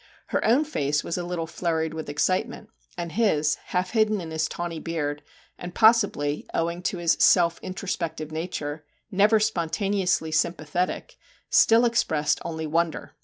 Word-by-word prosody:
Her - - 0
own 255 +8 +3
face 145 - -1
was - - -3
a - - -3
little 175 -1 -3
flurried 160 -1 -2
with 160 -2 -6
excitement, 190 +9 -1 0.3
and 170 -1 -4
his, 155 -9 +2
half 180 -1 -2
hidden 215 -2 +2
in 165 -3 -7
his 160 0 0
tawny 170 -2 -4
beard, 150 -3 -3 0.4
and 175 0 -8
possibly, 205 -11 +3
owing 170 +1 -1
to 180 - -2
his 170 -1 +2
self 170 -2 +4
introspective 170 -5 -4
nature, 155 -2 -4 0.3
never 210 +3 +4
spontaneously 195 -3 0
sympathetic, 170 +2 -1 0.3
still 230 +2 +5
expressed 155 -11 +1
only 160 -1 -4
wonder! 165 +1 -1
170 Hz, 145 wpm, -25 LUFS, 160-195 Hz, 0.4 s, still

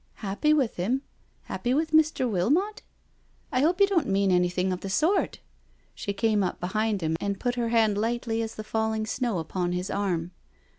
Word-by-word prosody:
" - - -38
Happy 205 +11 +1
with 275 -7 +2
him? 240 +10 0 0.4
Happy 245 +1 -2
with 315 +2 0
Mr. 310 -4 +3
Wilmot? 285 - +1 0.7
I 255 - +1
hope 345 +6 +2
you 400 - +7
don't 385 -6 +1
mean 195 -1 +2
anything 180 +1 +2
of 180 - -4
the 195 - -5
sort." 325 - +1 0.5
She 200 - -4
came 210 +1 +1
up 185 - -2
behind 215 +2 -1
him 160 0 0
and 200 -1 -2
put 245 -1 0
her 240 -1 -1
hand 220 -3 +3
lightly 230 0 -1
as 225 0 -4
the 215 - -6
falling 220 0 -1
snow, 235 -2 -1
upon 175 +2 -2
his 180 +2 -3
arm. 180 -4 -1
220 Hz, 190 wpm, -27 LUFS, 190-255 Hz, 0.7 s, you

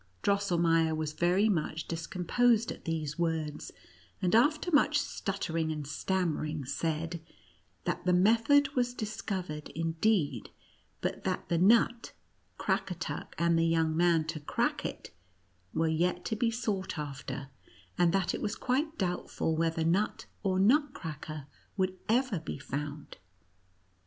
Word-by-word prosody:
Drosselmeier 170 -5 +2
was 155 -1 -2
very 180 +6 +3
much 160 -5 -1
discom 170 +2 -4
posed 240 0 +4
at - - -10
these 155 -2 -3
words; 160 -3 -2 0.5
and, 180 - 0
after 300 +9 +3
much 290 -1 +4
stuttering 165 - -2
and 150 -2 -4
stammering, 155 -2 -1
said, 160 +4 -2 0.6
that - - -2
the 180 - +2
method 230 +10 +5
was 245 -2 0
dis 220 -1 -4
covered, 180 -7 -4
indeed, 165 - 0 0.5
but - - -2
that - - -2
the 170 - +2
nut 230 +4 +4 0.4
Crackatuck - - -2
and 170 -1 +3
the 165 - +3
young 160 -1 +2
man 170 -1 +3
to 160 0 -4
crack 145 - -1
it - - -9 0.6
were 160 +1 +1
yet 175 +3 0
to 220 - -1
be 230 +2 +1
sought 215 -6 -2
after, 140 -1 -5 0.5
and 175 -1 +3
that 190 -1 +1
it - - -3
was 205 - -1
quite 295 +5 -1
doubtful 175 -3 -1
whether 165 0 0
nut 185 +6 +1 0.2
or 190 -2 +1
nutcracker 165 - 0 0.3
would 185 -1 +1
ever 240 -4 +2
be 160 - -5
found. 145 +1 -6
175 Hz, 135 wpm, -31 LUFS, 160-215 Hz, 0.6 s, method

